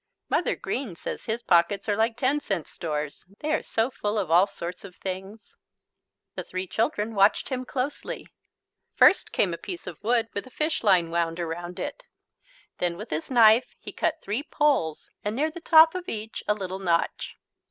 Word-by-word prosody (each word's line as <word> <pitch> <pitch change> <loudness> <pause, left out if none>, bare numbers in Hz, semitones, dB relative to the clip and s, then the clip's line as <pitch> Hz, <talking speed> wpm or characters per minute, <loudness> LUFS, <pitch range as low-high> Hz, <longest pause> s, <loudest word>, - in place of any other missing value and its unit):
Mother - - +1
Green 245 -10 -4
says - - -6
his 230 +1 -2
pockets 175 +3 +3
are 205 - +2
like 225 +2 +1
ten 270 +4 +2
cent 195 - -2
stores. 150 -4 -4 0.2
They 305 - -2
are 310 - +1
so 230 +3 -1
full 210 -3 -2
of 190 -6 -1
all 180 +4 +6
sorts 175 -2 -7
of 190 -3 -11
things. 190 +3 -7 0.8
The - - -5
three 185 +1 -4
children 220 +3 -1
watched 200 0 +3
him 255 -1 -3
closely. 265 +3 -4 0.7
First 385 - +5
came 180 -4 +1
a 170 - -5
piece 180 -3 -6
of 175 -4 -8
wood 230 0 +2
with 200 - -4
a - - -11
fishline 205 - +2
wound 170 0 0
around 175 +1 -5
it. 290 0 -4 0.8
Then 175 -1 0
with 215 +4 -8
his 150 +1 -3
knife 230 -1 +5
he - - -7
cut 320 0 -1
three 210 +6 -1
poles 285 - 0
and 210 +1 -2
near 305 +5 0
the 345 +1 -9
top 320 -1 +7
of 365 -1 -5
each 220 0 -5
a 210 - +3
little 190 -2 -5
notch. 170 -3 0
210 Hz, 185 wpm, -26 LUFS, 175-255 Hz, 0.8 s, top